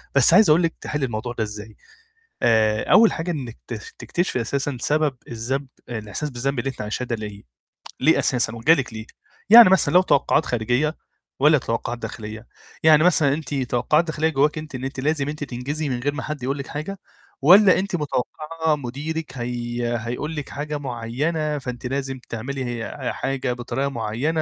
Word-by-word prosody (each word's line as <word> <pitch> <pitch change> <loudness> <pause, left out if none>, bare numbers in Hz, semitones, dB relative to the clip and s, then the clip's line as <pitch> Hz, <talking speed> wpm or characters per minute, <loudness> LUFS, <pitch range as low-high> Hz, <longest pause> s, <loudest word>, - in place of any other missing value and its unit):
بس - - +6
عايز 220 -5 +7
أقول 160 +4 +5
لِك 165 - +1
تحلي 145 -2 -2
الموضوع 120 0 -4
ده 115 - -2
إزاي. 105 0 -8 0.7
آآ، 110 -2 +2
أول 225 0 +7
حاجة 165 +1 -3
إنِك 130 -8 -5
ت 120 - -5 0.2
تكتشفي 175 -7 -1
أساسًا 135 +4 -2
سبب 150 0 +1
الذنب 130 +4 -3 0.2
الإحساس 115 +6 -4
بالذنب 135 +2 -2
اللي 135 - -1
أنتِ 130 - -7
عايشاه 105 +4 -3
ده 120 - -2
لاقيه؟ 105 -2 -8 0.6
ليه 155 +5 +4
أساسًا؟ 120 -3 0
وجه 115 +8 +4
لِك 130 -6 -2
ليه؟ 110 0 -7 0.4
يعني 230 -2 +10
مثلًا 190 -2 +3
لو 180 - +7
توقعات 155 -2 +2
خارجية 125 +6 0 0.4
والّا 150 +3 +5
توقعات 120 -1 -3
داخلية؟ 110 0 -7 0.4
يعني 155 -1 +6
مثلًا 155 -5 +4
أنتِ 145 -2 -5
توقعات 135 +4 +1
داخلية 160 -1 0
جواكِ 150 +1 +1
أنتِ 155 -3 -7
إن 130 - -6
أنتِ 135 0 -4
لازم 145 +1 0
أنتِ 150 0 -5
تنجزي 140 +4 -4
من 125 -2 -2
غير 145 +4 -1
ما 145 - -5
حد 150 -4 -5
يقول 135 +2 -1
لِك 140 - -6
حاجة 165 +7 -5 0.4
والّا 185 +6 +7
أنتِ 190 -1 -2
متوقعة 155 +2 -1
مُديرِك 145 +3 -5
هي 120 0 -2
هيقول 125 +7 -4
لِك 150 -3 -5
حاجة 150 +1 -4
معينة، 145 +5 -2
فأنتِ 125 -2 -6
لازم 135 0 -3
تعملي، 130 +4 -4
هي 120 +2 -4
حاجة 135 -2 -2
بطريقة 125 +3 -2
مُعينة؟ 135 +6 -1
135 Hz, 175 wpm, -23 LUFS, 120-155 Hz, 0.7 s, يعني